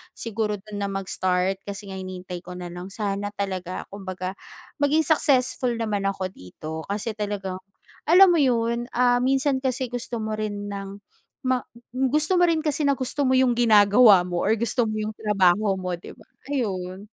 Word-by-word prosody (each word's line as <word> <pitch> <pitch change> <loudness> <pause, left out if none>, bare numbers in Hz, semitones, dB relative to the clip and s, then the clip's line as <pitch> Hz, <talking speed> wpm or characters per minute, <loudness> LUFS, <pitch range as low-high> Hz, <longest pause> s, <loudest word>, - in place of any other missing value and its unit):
siguro 220 -2 -2
do'n 205 +1 -8
na 200 - -1
mag-start. 190 -1 -1
Kasi 200 0 -7
nga 190 - -6
hinihintay 185 -1 -6
ko 180 +1 -10
na 180 -1 -7
lang, 175 +1 -7
sana 200 0 -3
talaga 185 -2 -4
kumbaga 185 -2 -5 0.5
maging 295 +2 +3
successful 260 -5 +2
naman 210 -3 -1
ako 190 -1 -2
dito. 155 - -8
Kasi 205 +3 -2
talagang, 200 -3 -4 0.5
alam 365 +5 +8
mo 340 - +3
'yon, 235 -2 +1
ah, 245 0 +4
minsan 270 +1 +2
kasi 255 -1 -2
gusto 245 -1 -4
mo 215 0 -3
rin 205 -1 -4
ng 200 0 -7 0.4
ma 255 -1 +2 0.3
gusto 300 +7 +2
mo 355 - +5
rin 320 -2 +1
kasi 300 -1 -1
na 280 - +3
gusto 265 +1 -1
mo 260 - +3
'yong 260 -1 +4
ginagawa 210 -3 +6
mo 175 -1 -2
or 215 +3 +2
gusto 235 +1 0
mo 215 - -3
'yong 215 0 -3
trabaho 200 -1 +3
mo, 185 -1 -3
'di - - -11
ba? - - -18 0.2
Ayun. 195 -8 -3
210 Hz, 175 wpm, -24 LUFS, 190-250 Hz, 0.5 s, alam